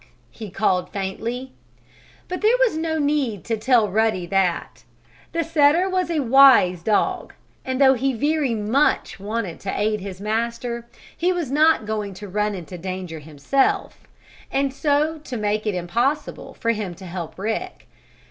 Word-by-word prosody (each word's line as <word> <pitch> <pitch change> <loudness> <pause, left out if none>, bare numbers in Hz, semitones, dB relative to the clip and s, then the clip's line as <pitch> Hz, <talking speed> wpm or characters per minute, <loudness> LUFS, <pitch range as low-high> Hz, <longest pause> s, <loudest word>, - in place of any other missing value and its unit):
he 215 -3 -8
called, 185 -1 0
faintly. 230 +7 -4 0.8
But 365 - -4
there 445 +4 +4
was - - +3
no 320 0 -1
need 285 - 0
to 230 - -1
tell 225 0 +3
Ruddy 210 -2 +1
that. 185 -1 -1 0.5
The 335 0 0
setter 320 +3 +3
was 370 -2 0
a 320 -3 0
wise 255 -9 +6
dog, 210 +4 0 0.3
and 260 0 -3
though 265 -1 +7
he 270 +2 0
very 285 0 0
much 225 +6 +1
wanted 205 -3 -4
to 195 - -4
aid 215 +1 +1
his 190 -1 -7
master, 235 +3 -3 0.3
he 355 +2 +1
was 340 -7 -2
not 310 -4 +4
going 210 -2 -3
to 205 +2 -8
run 210 +2 -1
into 180 0 -8
danger 185 -2 -5
himself, 155 - -1 0.4
and 275 -1 0
so 300 +2 0
make 215 -1 -1
it 205 - 0
impossible 235 - -2
for 230 - 0
him 210 -6 -4
to 190 - -12
help 175 -2 -6
Rick. 225 - -4
230 Hz, 155 wpm, -22 LUFS, 195-285 Hz, 0.8 s, though